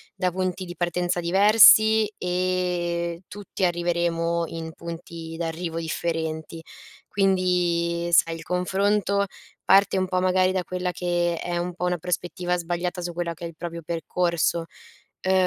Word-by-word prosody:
da 185 -2 0
punti 185 +1 -2
di 175 0 -8
partenza 175 0 -1
diversi 215 +4 +6
e 180 -2 -1
tutti 200 -1 -3
arriveremo 170 -1 0
in 160 0 -6
punti 165 -1 -8
d'arrivo 165 0 -3
differenti. 160 -1 -3 0.5
Quindi 180 -3 +1
sai 165 0 +4
il 165 - -9
confronto 200 +3 +1 0.4
parte 195 0 +5
un 185 0 0
po' 185 0 0
magari 185 0 +3
da 185 -1 -1
quella 180 0 -3
che 175 -1 -1
è 175 0 -3
un 175 +1 -3
po' 180 - -3
una 180 0 0
prospettiva 180 +1 -2
sbagliata 175 +1 -3
su 175 0 -4
quello 170 0 -3
che 170 +1 -8
è - - -3
il 165 - -11
proprio 170 0 -6
percorso. 170 0 -1 0.6
Uhm, 190 - +3
175 Hz, 145 wpm, -24 LUFS, 170-185 Hz, 0.6 s, diversi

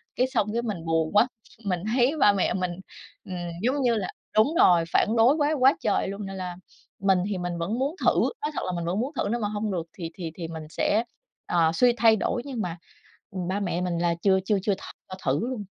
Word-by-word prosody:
cái 255 - +2
xong 220 -5 0
cái 235 - 0
mình 200 -8 -4
buồn 165 -1 +1
quá, 210 +4 +5 0.4
mình 180 -3 0 0.2
thấy 255 +3 +3
ba 205 - +6
mẹ 195 - +1
mình, 180 -2 -1 0.5
ừm, 185 - -6 0.3
giống 265 +5 +1
như 240 -2 +3
là 195 -4 -1 0.3
đúng 225 +10 +4
rồi, 175 -2 +6
phản 220 - +3
đối 245 +6 +6
quá 300 0 +1
quá 265 +3 +6
trời - - 0
luôn, 200 +1 -5
nên 195 0 -6
là 180 -1 -5 0.4
mình 190 -1 +3
thì 195 - -2
mình 175 -1 -3
vẫn 200 +9 -2
muốn 285 +6 -1
thử, - - +7 0.3
nói 300 - -2
thật - - -3
là 185 - -2
mình 170 -1 -3
vẫn 180 +4 -1
muốn 255 +5 -1
thử 205 - -1
nếu 240 - 0
mà 210 - -1
hông 210 0 -2
được 175 -3 -2
thì 165 -3 -5
thì 170 -4 -5
thì 170 -2 -5
mình 160 -1 -7
sẽ, 215 +7 +1 0.4
ờ, 165 -2 +2
suy 245 +7 +4
thay 225 -1 +6
đổi, 235 - -1
nhưng 255 -5 -4
mà, 175 -3 -4 0.5
ừm, 185 -3 -4
ba 200 +2 -1
mẹ 175 -3 -1
mình 180 -2 -1
là 170 0 +1
chưa 190 -1 +4
chưa 205 +1 +2
chưa 205 - +1
th - - -14 0.3
cho 185 - -6
thử 135 +1 +1
luôn. 240 -6 -4
200 Hz, 245 wpm, -26 LUFS, 175-235 Hz, 0.5 s, thử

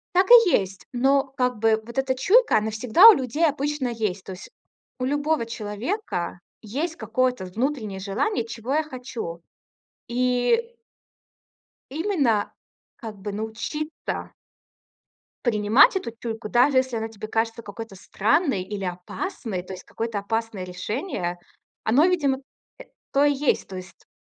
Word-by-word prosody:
Так 370 +1 +5
и 465 -6 +9
есть. 195 - 0
Но, 270 +3 +3
как 250 -3 0
бы, 220 0 +3
вот 235 +3 -7
эта 265 -1 +1
чуйка, 410 - +4
она 220 +1 -2
всегда 250 - +7
у - - +11
людей 295 - +1
обычно 290 -2 -1
есть. 215 -5 -3
То 190 - -7
есть 185 - -10 0.5
у 255 - -2
любого 290 -2 0
человека 215 - -4 0.2
есть 300 +10 -3
какое-то 250 -1 0
внутреннее 215 0 -3
желание, 225 - -1
чего 235 +4 -4
я 310 - +3
хочу? 245 - -7 0.7
И 250 - +1 1.2
именно, 290 - +1 0.4
как 220 -3 -8
бы, 200 +1 -5
научиться 230 +9 -5 1.1
принимать 220 - +5
эту 240 -11 -2
чуйку, 225 -2 -5
даже 255 +4 +4
если 260 -2 0
она 225 0 -2
тебе 215 -1 -8
кажется 225 +1 -1
какой-то 210 0 -8
странной, 225 - +1
или 195 0 -5
опасной, 185 - -4
то 185 - -9
есть 185 - -9
какое-то 225 -2 -4
опасное 225 -1 -3
решение, 180 - -4 0.5
оно, 275 +10 +4
видимо, 285 -8 +1 0.4
э, - - -8 0.3
то 280 +1 +4
и 290 - +4
есть. 285 0 0
То 190 - -7
есть, 180 -2 -11
235 Hz, 140 wpm, -24 LUFS, 210-285 Hz, 1.2 s, у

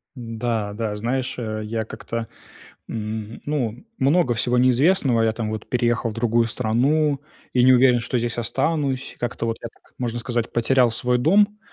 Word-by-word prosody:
Да, 115 -3 -3
да 105 -1 -3
знаешь, 125 +4 -2
э, 110 -2 -3
я 110 0 -3
как-то, 115 0 -5 0.6
м, 110 0 -5
ну, 125 - -2
много 140 -2 +3
всего 125 +3 +1
неизвестного: 130 -1 +3
я 110 0 +2
там 110 -1 -3
вот 110 0 -5
переехал 120 -1 +1
в - - -6
другую 115 0 +1
страну 135 +6 +1 0.3
и 125 - +3
не 130 - +7
уверен, 125 -1 +5
что 120 +1 -1
здесь 120 0 -2
останусь. 135 +3 -1
Как-то 120 -1 -2
вот 115 - -1
я 115 - -4
так, - - -29
можно 120 -1 -2
сказать, 120 -1 -2
потерял 120 +1 +3
свой 125 +2 0
дом. 205 - +3
120 Hz, 170 wpm, -23 LUFS, 115-130 Hz, 0.6 s, не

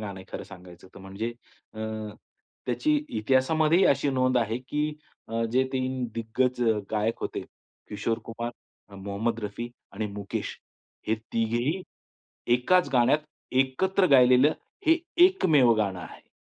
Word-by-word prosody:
गाणं 100 -3 -6
आहे - - -12
खरं - - -4
सांगायचं 90 0 -13
त - - -11
म्हणजे 100 +5 -5 0.4
अ, 110 - -10 0.9
त्याची 125 +5 +1
इतिहासामध्ये 135 +9 +2
ही 195 - +5
अशी 140 0 +2
नोंद 130 -1 +2
आहे 115 0 -1
की 150 +1 0 0.4
अ, 115 +1 -1
जे 130 +1 +3
3 130 -1 -1
दिग्गज 125 +2 0 0.3
गायक 110 +1 -1
होते - - -3 0.5
किशोर 110 +2 -2
कुमार, 115 +1 -5 0.5
मोहम्मद 100 +4 -2
रफी 105 +3 -5 0.2
आणि 105 +2 -3
मुकेश, 100 -1 -5 0.5
हे 110 - +3 0.2
तिघेही 120 +10 0 0.7
एकाच 180 +9 +3
गाण्यात, 125 +4 +4 0.3
एकत्र 135 +10 +2
गायलेलं, 130 +2 +6 0.3
हे 325 +2 +5 0.3
एकमेव 155 - +4
गाणं 100 -4 -1
आहे. - - -11
120 Hz, 130 wpm, -27 LUFS, 110-135 Hz, 0.9 s, गायलेलं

